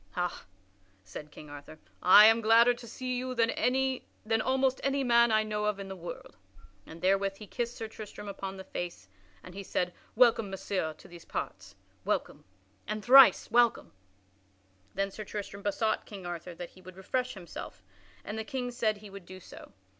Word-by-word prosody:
"Ha," 175 0 -3 0.6
said 100 +11 -9
King 150 +1 -12
Arthur, 145 +2 -10 0.2
"I 205 +3 +9
am 225 +1 +6
gladder 230 +2 +6
to 240 0 -11
see 255 +2 -4
you 255 0 -3
than 245 -1 0
almost 260 +1 +1
any 275 0 +1
man 235 -2 +5
I 215 0 +4
know 210 -1 -2
of 210 -1 0
in 195 -1 -7
the 190 - -6
world," 175 -1 -9 0.5
and 165 +2 -11
therewith 195 +1 +2
he 210 - -10
kissed 235 +4 -4
Sir 225 - -4
Tristram 215 -1 -9
upon 195 -1 -6
the 190 - -8
face, 175 - -6 0.4
and 180 - -11
he 200 - -6
said: 180 -2 -2 0.2
"Welcome, 230 -3 +4
Messire, 190 -4 -3
to - - -16
these 170 -1 -13
parts! 95 +1 -6 0.3
Welcome! - - -2 0.4
And 215 0 -4
thrice 265 +1 +8
welcome!" 240 -1 +3 1.0
Then 195 +1 -1
Sir 215 - -7
Tristram 200 -1 -6
besought 210 +2 -1
King 195 -4 -9
Arthur 175 0 -6
that 175 0 -8
he 185 - -18
would 185 0 -12
refresh 250 +6 -2
himself, 170 - -9 0.4
and 215 +2 -4
the - - -2
King 250 0 -4
said 220 -3 0
he 205 -1 -12
would 195 -3 -11
do 185 0 -10
so. - - -13
210 Hz, 180 wpm, -30 LUFS, 185-235 Hz, 1.0 s, I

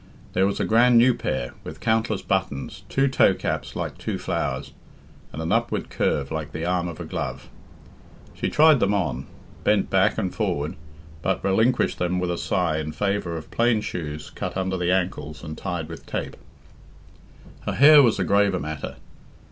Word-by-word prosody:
There 95 +1 +3
was 100 - -2
a - - +1
grand 120 +2 +5
new 125 +2 +6
pair, 65 - -3
with - - -8
countless 110 -2 0
buttons, 95 -8 -2
two 135 +1 +2
toecaps 130 - +1
like - - -4
two - - -3
flowers, - - -3 0.6
and 80 +3 -5
an 80 - -2
upward 115 +2 0
curve 70 0 0
like 80 -2 -4
the 80 +2 -3
arm 90 0 0
of 85 -2 -7
a - - -5
glove. - - -5 0.8
She - - -2
tried 155 -2 +6
them 105 -1 +2
on, 70 -10 -2 0.4
bent - - +2
back - - +3
and - - -1
forward, 75 +2 -2 0.5
but 95 +2 -1
relinquished 110 +6 +2
them 90 +1 0
with 90 -1 -1
a 85 - -2
sigh 85 -5 0
in 75 0 -4
favour 100 -4 -1
of 80 - -10
plain 115 -1 +2
shoes 75 -6 -5
cut - - -5
under 95 0 -1
the 90 -1 0
ankles 90 -5 -2
and 80 -1 -6
tied 85 -4 -4
with 80 0 -10
tape. - - -4 1.3
Her - - 0
hair 145 +2 +8
was 120 -5 +3
a 95 - +1
graver 100 0 +2
matter. 75 0 -5
90 Hz, 175 wpm, -24 LUFS, 80-110 Hz, 1.3 s, hair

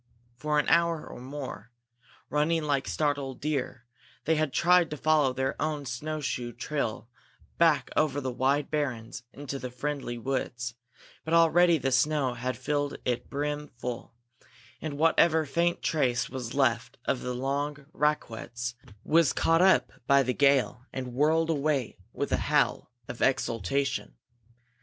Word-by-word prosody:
For 150 +3 -1
an 150 - +2
hour 170 -2 +3
or - - -10
more, 130 -1 -7 0.6
running 155 +2 +1
like 140 -2 0
startled 145 -3 -1
deer, 135 -4 -3 0.4
they 160 - +3
had 155 -2 0
tried 175 +4 +4
to 150 - -5
follow 150 -2 +3
their 130 +2 -1
own 150 -2 -1
snow 150 +6 -4
shoe 125 -4 -3
trail 120 -4 -3 0.5
back 155 -6 +3
over 145 -2 +2
the 130 -2 -3
wide 135 +3 0
barrens 125 -7 -2
into 140 -1 -6
the 125 - -5
friendly 130 -1 -4
woods; 125 -1 -3 0.5
but 160 +1 +1
already 170 +1 +5
the 135 -2 -1
snow 135 0 +2
had 125 0 -3
filled 145 +2 -1
it 125 -1 -2
brim 150 +1 -2
full, 120 -1 -7 0.7
and 150 -3 -4
whatever 160 0 +4
faint 170 +4 0
trace 125 -6 +1
was 125 -2 -5
left 120 -3 +1
of 130 - 0
the 125 0 -3
long 140 +2 -2
raquettes 125 -4 -2 0.3
was 165 -2 +4
caught 165 +1 +3
up 190 0 +4
by 140 0 +5
the 130 0 0
gale 135 -3 +2
and 130 -2 -5
whirled 160 +5 +2
away 145 -4 -1
with - - -3
a - - +3
howl - - +1 0.2
of 120 - -7
exultation. 125 - 0
140 Hz, 145 wpm, -28 LUFS, 125-155 Hz, 0.7 s, already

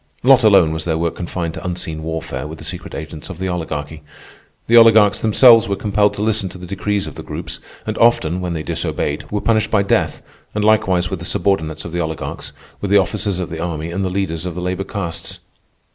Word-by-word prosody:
Not 130 -1 +6
alone 95 -7 +6
was 80 0 -3
their 80 -2 -1
work 85 0 -1
confined 85 -2 -4
to - - -8
unseen 90 -3 -4
warfare 80 -1 -4
with 80 +1 -8
the - - -11
secret 85 +2 -6
agents 80 +1 -7
of 95 - -7
the 95 +1 -3
Oligarchy. 80 -3 -4 0.6
The 115 - +3
oligarchs 110 -3 +7
themselves 115 0 +6
were 100 - +1
compelled 105 +1 +1
to 105 - -2
listen 110 -3 0
to 90 - -11
the 90 - -9
decrees 100 +2 -2
of - - -7
the - - -8
Groups, - - -6 0.3
and - - -3
often, 90 -7 +3
when 90 -1 -2
they 80 -2 -4
disobeyed, 75 0 -3
were 105 0 -1
punished 110 -1 +1
by 100 -2 +2
death—and 105 +1 -2
likewise 95 -5 +2
with 95 - -3
the 85 - -7
subordinates 85 -5 -1
of 85 - -6
the 85 +1 -1
oligarchs, 80 -2 -5 0.3
with 100 - -2
the 100 - +5
officers 100 0 0
of 90 -3 -4
the 80 - -5
army 85 -1 -3
and 95 +3 -2
the 95 - 0
leaders 90 -4 -2
of 90 -2 -5
the - - -4
labor 90 +2 -2
castes. 85 -5 -5
90 Hz, 220 wpm, -19 LUFS, 80-105 Hz, 0.6 s, oligarchs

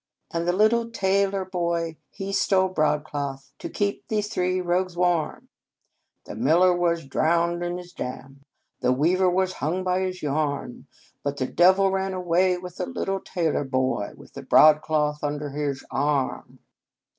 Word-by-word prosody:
"And 170 0 -2
the - - +4
little 220 +5 +2
tailor 195 -2 +1
boy, 170 -3 -2
he 195 0 -6
stole 190 -1 +2
broad 150 -4 +1
cloth, 140 -3 -5
To - - -6
keep 200 -1 -2
these 210 -1 -1
three 185 -3 0
rogues 180 0 -1
warm." 175 -3 0 0.4
" - - -52
The - - -8
miller 165 - +4
was 170 -2 0
drowned 170 +5 +1
in 175 0 -2
his 180 0 -10
dam, 135 +2 -7 0.4
The 125 - +2
weaver 175 +8 +3
was 185 +1 +1
hung 180 +4 -2
by 185 0 +1
his 185 -2 -3
yarn, 145 -3 -2 0.4
But 140 0 -2
the 130 - -1
Devil 190 +6 +4
ran 190 0 -1
away 180 0 +2
with 180 0 -9
the - - -3
little 195 -6 -2
tailor 165 -6 -1
boy, 130 -6 -1
With - - -16
the 140 - -7
broadcloth 150 +1 +4
under 145 0 -3
his 140 -2 -3
arm." 145 -3 -1
175 Hz, 160 wpm, -25 LUFS, 150-185 Hz, 0.4 s, the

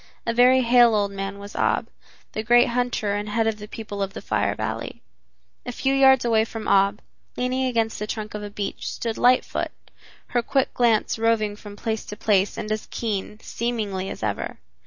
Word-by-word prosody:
A 230 - 0
very 250 +2 +5
hale 240 -1 +5
old 200 -1 +1
man 195 0 -5
was 200 +1 -10
Ab, - - +1 0.4
the 215 - -3
great 240 +2 +5
hunter 240 -4 0
and 205 +1 -3
head 225 +2 +1
of 220 -1 -1
the 210 - -8
people 210 -2 -6
of 195 0 -2
the - - -7
Fire - - 0
Valley. - - -5 0.6
A - - -5
few 265 +2 0
yards 265 -2 +5
away 225 -2 +3
from 225 -1 -6
Ab, 200 +1 +3 0.3
leaning 255 +1 0
against 225 -3 0
the 210 - -3
trunk 215 -1 -5
of 210 - -5
a 205 - -6
beech, 205 0 -4
stood 230 -2 -4
Lightfoot, 250 +1 +2 0.6
her 240 - +1
quick 270 +3 0
glance 230 -2 +2
roving 220 -2 +1
from 205 -1 -11
place 220 +1 -3
to 210 - -8
place 200 -2 +2
and 215 - -4
as 215 0 -2
keen, 210 -2 -3
seemingly, 210 -5 -3
as - - -7
ever. 105 -2 -3
220 Hz, 195 wpm, -24 LUFS, 205-240 Hz, 0.6 s, very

